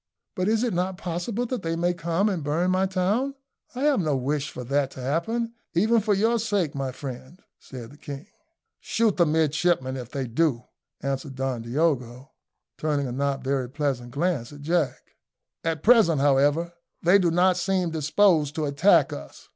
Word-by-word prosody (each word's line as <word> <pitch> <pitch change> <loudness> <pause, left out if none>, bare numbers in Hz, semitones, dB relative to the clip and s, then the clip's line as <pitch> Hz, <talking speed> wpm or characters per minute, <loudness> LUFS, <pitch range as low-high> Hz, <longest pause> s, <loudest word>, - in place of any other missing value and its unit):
"But 185 -2 -1
is 225 +1 +2
it 240 - 0
not 180 +1 -1
possible 190 +7 -3
that 245 -2 -3
they 165 -1 -2
may 175 +1 +1
come 170 +4 0
and 185 -7 -1
burn 165 +5 +1
my 190 +1 +2
town? 205 +9 0 0.4
I 255 - -4
have 290 -2 +3
no 155 -5 +1
wish 140 +2 -1
for 125 - -7
that 140 +2 0
to - - -11
happen, 195 - -1 0.2
even 220 +6 +3
for 210 -1 +1
your 225 +4 +2
sake, 205 -8 0
my 135 -2 -3
friend," 130 +5 -8 0.2
said 120 -3 -10
the 145 - -15
king. 140 0 -8 0.5
"Shoot 225 -2 0
the 170 -2 +4
midshipman 155 -3 +1
if 125 -2 -7
they 135 0 -3
do," 125 0 0 0.4
answered 135 0 -3
Don 130 -2 -2
Diogo, 130 0 -1 0.5
turning 150 -2 0
a 125 - -4
not 135 +1 -1
very 135 -2 -1
pleasant 135 -4 -2
glance 145 -2 -1
at 145 0 -11
Jack. 160 -1 -1 0.5
"At 160 -2 -2
present, 215 - +5
however, 145 +5 +2 0.3
they 180 +4 +6
do 175 -3 +2
not 180 +2 +3
seem 180 -1 0
disposed 155 -1 +2
to 155 - -1
attack 150 +1 +4
us. 70 - -10
160 Hz, 180 wpm, -25 LUFS, 135-185 Hz, 0.5 s, they